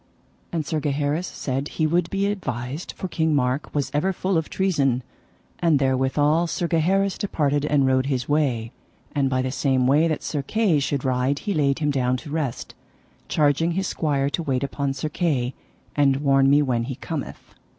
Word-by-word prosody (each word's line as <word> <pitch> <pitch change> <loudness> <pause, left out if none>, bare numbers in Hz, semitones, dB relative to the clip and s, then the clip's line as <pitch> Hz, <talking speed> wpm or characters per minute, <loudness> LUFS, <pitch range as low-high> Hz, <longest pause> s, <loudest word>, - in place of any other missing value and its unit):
And 160 -3 -2
Sir 155 +1 -1
Gaheris 145 +3 -1
said 135 +1 -3
he 155 - +2
would 170 +2 +1
be 195 0 0
avised 130 - -5
for 185 - -5
King 160 -3 +1
Mark 130 +1 0
was 145 -2 -1
ever 150 +7 +1
full 185 +1 -1
of 160 -1 0
treason: 140 -10 +1 0.6
and 165 -4 +3
therewithal 140 +5 +2
Sir 170 +1 -2
Gaheris 190 +4 +1
departed 145 -7 0
and 145 -2 +3
rode 130 0 +2
his 130 -3 -1
way. 130 -7 0 0.4
And 140 -2 +1
by 130 -1 0
the 130 - -2
same 130 -2 +1
way 145 +5 +4
that 155 -2 -2
Sir 150 - -2
Kay 195 +1 +1
should 140 -1 -2
ride 130 +2 +1
he 205 - 0
laid 140 -4 +2
him 150 -2 0
down 130 -2 +1
to 145 +3 -9
rest, 150 -6 -3 0.5
charging 155 +3 +2
his 190 +2 -1
squire 140 -5 0
to 170 - -2
wait 135 -5 -1
upon 140 0 -2
Sir 150 +3 -3
Kay; 140 -7 0 0.4
And 140 -2 +4
warn 135 -1 +3
me 145 +1 +5
when 120 -4 0
he 135 0 -4
cometh. 155 +1 -6
145 Hz, 185 wpm, -23 LUFS, 135-160 Hz, 0.6 s, me